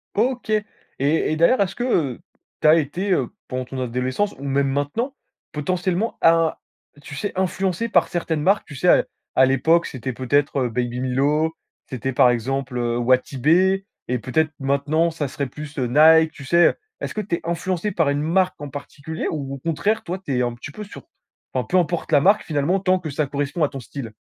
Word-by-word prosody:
OK. 245 Hz, +1 st, 0 dB
Et 215 Hz, -, +4 dB, 0.4 s
et 155 Hz, +2 st, +1 dB
d'ailleurs, 170 Hz, +9 st, +4 dB
est-ce 195 Hz, -1 st, 0 dB
que, 240 Hz, -, -3 dB
heu, 155 Hz, -, 0 dB, 0.4 s
tu -, -, +4 dB
as 155 Hz, -, +8 dB
été, 170 Hz, +6 st, -1 dB
heu, -, -, 0 dB, 0.2 s
pendant 130 Hz, -1 st, -3 dB
ton 130 Hz, +1 st, -6 dB
adolescence 130 Hz, -, -1 dB
ou 140 Hz, -, -10 dB
même 140 Hz, 0 st, +1 dB
maintenant, 145 Hz, -, -2 dB, 0.4 s
potentiellement 180 Hz, +7 st, -1 dB
à 165 Hz, -, +7 dB
un 165 Hz, -1 st, +1 dB, 0.5 s
tu 145 Hz, -, -9 dB
sais 205 Hz, +7 st, -3 dB
influencé 190 Hz, +3 st, -1 dB
par 175 Hz, -6 st, +3 dB
certaines 165 Hz, -3 st, -2 dB
marques, 195 Hz, +6 st, +2 dB
tu 145 Hz, -, -11 dB
sais 180 Hz, +7 st, -1 dB
à -, -, +6 dB, 0.3 s
à 130 Hz, -, +6 dB
l'époque 145 Hz, +6 st, +3 dB
c'était 130 Hz, 0 st, -5 dB
peut-être, 140 Hz, +3 st, +1 dB
heu, -, -, -1 dB
Baby 120 Hz, +1 st, -2 dB
Milo, 145 Hz, +5 st, +1 dB, 0.4 s
c'était 130 Hz, 0 st, -3 dB
par 125 Hz, -, +5 dB
exemple, 130 Hz, +2 st, -2 dB
heu, 120 Hz, -1 st, 0 dB
Wati 130 Hz, +2 st, +1 dB
B 130 Hz, -, -4 dB, 0.6 s
et 125 Hz, 0 st, -1 dB
peut-être 155 Hz, +7 st, 0 dB
maintenant 145 Hz, +4 st, +1 dB
ça 160 Hz, -3 st, -3 dB
serait 140 Hz, +1 st, -3 dB
plus 150 Hz, +3 st, -9 dB
Nike, 155 Hz, +5 st, +5 dB
tu 140 Hz, -, -12 dB
sais, 170 Hz, +4 st, +5 dB
heu, -, -, -2 dB, 0.3 s
est-ce -, -, -4 dB
que 215 Hz, -, -2 dB
tu 195 Hz, -4 st, -2 dB
es -, -, -7 dB
influencé 175 Hz, +3 st, -2 dB
par 165 Hz, -6 st, +1 dB
une 145 Hz, 0 st, 0 dB
marque 180 Hz, +4 st, +1 dB
en 145 Hz, 0 st, -6 dB
particulier 145 Hz, +3 st, -6 dB
ou 140 Hz, -4 st, -4 dB
au -, -, -5 dB
contraire 170 Hz, +9 st, -1 dB
toi 180 Hz, +2 st, -4 dB
tu 145 Hz, -8 st, -3 dB
es -, -, +2 dB
un 120 Hz, -1 st, 0 dB
petit 120 Hz, -, -9 dB
peu 210 Hz, -, -8 dB
sur 200 Hz, -, -11 dB
p -, -, -39 dB, 0.5 s
enfin, -, -, 0 dB
peu 185 Hz, -, +1 dB
importe 175 Hz, -1 st, 0 dB
la 145 Hz, -, +6 dB
marque 200 Hz, +7 st, +4 dB
finalement, 155 Hz, +5 st, 0 dB
tant 185 Hz, 0 st, +2 dB
que 160 Hz, -, -6 dB
ça 145 Hz, +1 st, -1 dB
correspond 145 Hz, +4 st, -2 dB
à 145 Hz, -, +2 dB
ton 135 Hz, -, -7 dB
style? 125 Hz, -1 st, -7 dB
150 Hz, 215 wpm, -22 LUFS, 135-175 Hz, 0.6 s, as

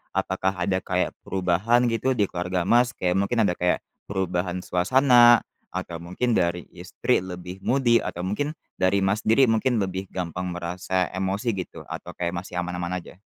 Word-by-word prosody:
apakah 95 Hz, +1 st, 0 dB
ada 95 Hz, +1 st, 0 dB
kayak -, -, -1 dB
perubahan 95 Hz, +6 st, +2 dB
gitu 130 Hz, +3 st, 0 dB
di 105 Hz, -4 st, +2 dB
keluarga 90 Hz, 0 st, -1 dB
Mas? 120 Hz, +6 st, +4 dB
Kayak 90 Hz, 0 st, 0 dB
mungkin 110 Hz, +3 st, +1 dB
ada 100 Hz, -, +2 dB
kayak 90 Hz, 0 st, +2 dB, 0.3 s
perubahan 90 Hz, -2 st, -2 dB
suasana 120 Hz, +4 st, +5 dB, 0.2 s
atau 85 Hz, -1 st, -5 dB
mungkin 90 Hz, +9 st, -2 dB
dari 90 Hz, -4 st, +1 dB
istri 90 Hz, 0 st, -1 dB
lebih 90 Hz, 0 st, -7 dB
moody 120 Hz, 0 st, +3 dB
atau 90 Hz, -, -5 dB
mungkin 145 Hz, +11 st, -2 dB, 0.2 s
dari 95 Hz, +1 st, +2 dB
Mas 95 Hz, +2 st, +1 dB
sendiri 115 Hz, +2 st, +5 dB
mungkin 115 Hz, -1 st, +2 dB
lebih 95 Hz, 0 st, -4 dB
gampang 90 Hz, 0 st, -4 dB
merasa 90 Hz, +1 st, -2 dB
emosi 95 Hz, +5 st, -1 dB
gitu 95 Hz, -4 st, -6 dB
atau 90 Hz, -1 st, -7 dB
kayak 85 Hz, -1 st, -2 dB
masih 90 Hz, 0 st, -10 dB
aman-aman 90 Hz, 0 st, -3 dB
aja? 90 Hz, -, -14 dB
95 Hz, 160 wpm, -25 LUFS, 90-115 Hz, 0.3 s, suasana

